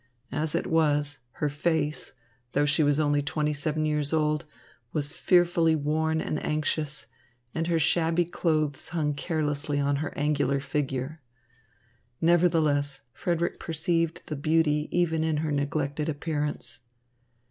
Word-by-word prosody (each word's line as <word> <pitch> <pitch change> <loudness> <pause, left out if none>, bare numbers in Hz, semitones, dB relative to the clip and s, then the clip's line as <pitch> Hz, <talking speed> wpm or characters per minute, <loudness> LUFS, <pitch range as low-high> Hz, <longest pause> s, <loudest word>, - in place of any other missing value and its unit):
As 150 +3 -1
it - - 0
was, 145 -3 +1
her 150 - -1
face, 150 +1 -1 0.4
though 145 +1 +3
she 150 +1 +2
was 145 0 +3
only 145 -1 +2
twenty 150 +1 -1
seven 155 +1 -1
years 150 -1 0
old, 155 0 +1 0.5
was 145 -1 -1
fearfully 170 -2 +3
worn 160 +2 0
and 155 - -2
anxious, 150 -1 -1 0.5
and 165 0 -1
her 170 -1 +2
shabby 165 +2 +2
clothes 155 -4 0
hung 155 -3 0
carelessly 145 -1 -1
on 140 0 +1
her 150 +1 -3
angular 145 -1 +1
figure. 140 +1 -3 1.0
Nevertheless, 160 -5 +3
Frederick 170 -1 -1
perceived 165 0 0
the 155 - -4
beauty 150 0 +2
even 165 -2 +1
in 160 -1 +1
her 155 - -1
neglected 145 +1 -1
appearance. 150 -2 -3
150 Hz, 130 wpm, -27 LUFS, 145-160 Hz, 1.0 s, though